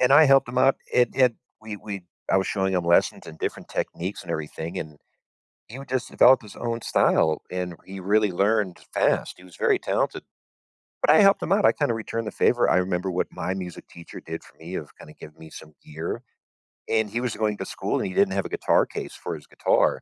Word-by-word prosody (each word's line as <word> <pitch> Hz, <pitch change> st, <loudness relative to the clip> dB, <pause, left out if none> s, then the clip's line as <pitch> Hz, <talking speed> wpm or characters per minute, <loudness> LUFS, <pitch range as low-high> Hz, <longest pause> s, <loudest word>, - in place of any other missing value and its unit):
and 125 Hz, +2 st, +4 dB
I 155 Hz, +2 st, +8 dB
helped 135 Hz, -3 st, +5 dB
him 125 Hz, +1 st, -2 dB
out. 135 Hz, +1 st, +4 dB, 0.2 s
It 125 Hz, -, +4 dB
it 125 Hz, -3 st, +4 dB, 0.3 s
we 110 Hz, -1 st, -7 dB
we 100 Hz, -2 st, -7 dB, 0.3 s
I -, -, +4 dB
was 95 Hz, -, +1 dB
showing 95 Hz, -1 st, 0 dB
him 90 Hz, -, 0 dB
lessons 85 Hz, 0 st, +2 dB
and 80 Hz, -, -11 dB
different -, -, -4 dB
techniques 90 Hz, +4 st, -4 dB
and 85 Hz, -, -9 dB
everything, 80 Hz, +3 st, -4 dB
and 75 Hz, -1 st, -7 dB, 0.7 s
he 125 Hz, +5 st, -9 dB
would 135 Hz, -, -10 dB
just 130 Hz, -1 st, -2 dB
develop 130 Hz, -1 st, +6 dB
his 105 Hz, -, -13 dB
own 115 Hz, -1 st, -3 dB
style, 80 Hz, -6 st, +2 dB
and 90 Hz, -1 st, -3 dB
he 95 Hz, 0 st, -8 dB
really 105 Hz, +1 st, +2 dB
learned 100 Hz, 0 st, +1 dB, 0.2 s
fast. -, -, +1 dB
He 90 Hz, -, -15 dB
was 90 Hz, -2 st, -15 dB
very -, -, +2 dB
talented. -, -, -1 dB, 0.8 s
But -, -, +4 dB
I 155 Hz, -, +7 dB
helped 195 Hz, -1 st, +5 dB
him 185 Hz, -, -1 dB
out, 205 Hz, 0 st, +3 dB
I -, -, +6 dB
kinda 145 Hz, -6 st, 0 dB
returned 115 Hz, 0 st, -4 dB
the -, -, -2 dB
favor. 120 Hz, -1 st, +3 dB
I -, -, +4 dB
remember 90 Hz, 0 st, 0 dB
what 90 Hz, -, 0 dB
my 95 Hz, -, -3 dB
music 90 Hz, -3 st, -7 dB
teacher 85 Hz, 0 st, -11 dB
did 80 Hz, 0 st, -7 dB
for -, -, -20 dB
me 85 Hz, +3 st, -7 dB
of 75 Hz, -, -8 dB
kinda 75 Hz, -, -13 dB
giving 75 Hz, -, -12 dB
me 80 Hz, 0 st, -12 dB
some 75 Hz, -, -12 dB
gear, 80 Hz, +2 st, -5 dB, 0.7 s
and 110 Hz, -1 st, +1 dB
he 115 Hz, +4 st, -2 dB
was 125 Hz, -3 st, -2 dB
going 105 Hz, -1 st, -1 dB
to -, -, -5 dB
school, -, -, -2 dB
and -, -, -1 dB
he 95 Hz, -, -6 dB
didn't 200 Hz, -1 st, +3 dB
have -, -, -1 dB
a -, -, -5 dB
guitar 425 Hz, -, +2 dB
case -, -, -7 dB
for -, -, -5 dB
his -, -, -12 dB
guitar, -, -, +1 dB
100 Hz, 230 wpm, -25 LUFS, 90-120 Hz, 0.8 s, I